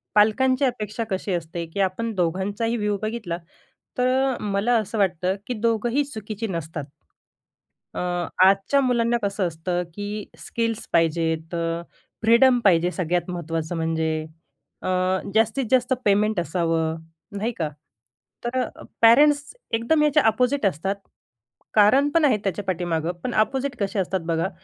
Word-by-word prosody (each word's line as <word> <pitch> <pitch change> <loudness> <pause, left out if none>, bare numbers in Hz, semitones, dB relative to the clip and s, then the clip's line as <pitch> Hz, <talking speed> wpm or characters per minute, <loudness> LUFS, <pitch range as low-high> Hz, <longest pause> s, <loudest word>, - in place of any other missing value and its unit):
पालकांची 255 +6 +4
अपेक्षा 230 -3 -2
कशी 190 0 -2
असते 170 0 -3
की - - -4
आपण 210 +5 -1
दोघांचाही 195 +6 -1
व्ह्यू 210 -1 0
बघितला, 215 -6 -3 0.6
तर 260 +1 +2
मला 205 +4 +1
असं 215 +1 -3
वाटतं 185 -1 +1
की 250 - -2
दोघंही 235 +4 +1
चुकीचे 220 -4 -5
नसतात. 160 -3 -4 1.1
अ, - - -5 0.5
आजच्या 195 +8 +4
मुलांना 240 -2 +2
कसं 200 -1 0
असतं 175 +2 -2
की 205 +1 -4
स्किल्स 230 -1 -3
पाहिजेत. 160 0 +1
अ, 165 0 -2 0.4
फ्रीडम 245 +3 +5
पाहिजे 175 -3 +4
सगळ्यात 175 -1 -1
महत्त्वाचं 165 -1 -3
म्हणजे. 160 -1 0 0.7
अ, - - -3 0.5
जास्तीत-जास्त 245 +3 +2
पेमेंट 205 -1 +3
असावं, 165 -1 0 0.4
नाही 220 +4 -1
का? 160 -3 0 0.8
तर, 250 +2 -1 0.4
पॅरेंट्स 285 - +5 0.2
एकदम 235 +8 +2
याच्या 300 0 +4
अपोझिट 250 +3 +2
असतात. 190 +2 0 0.8
कारण 220 +7 +5
पण 330 -2 +4
आहेत 260 -7 +4
त्याच्या 195 0 -2
पाठीमागं. 175 -3 -1
पण 245 - -2
अपोझिट 265 +4 0
कसे 200 +1 -1
असतात 190 0 0
बघा, 165 +2 0
205 Hz, 130 wpm, -24 LUFS, 175-235 Hz, 1.1 s, फ्रीडम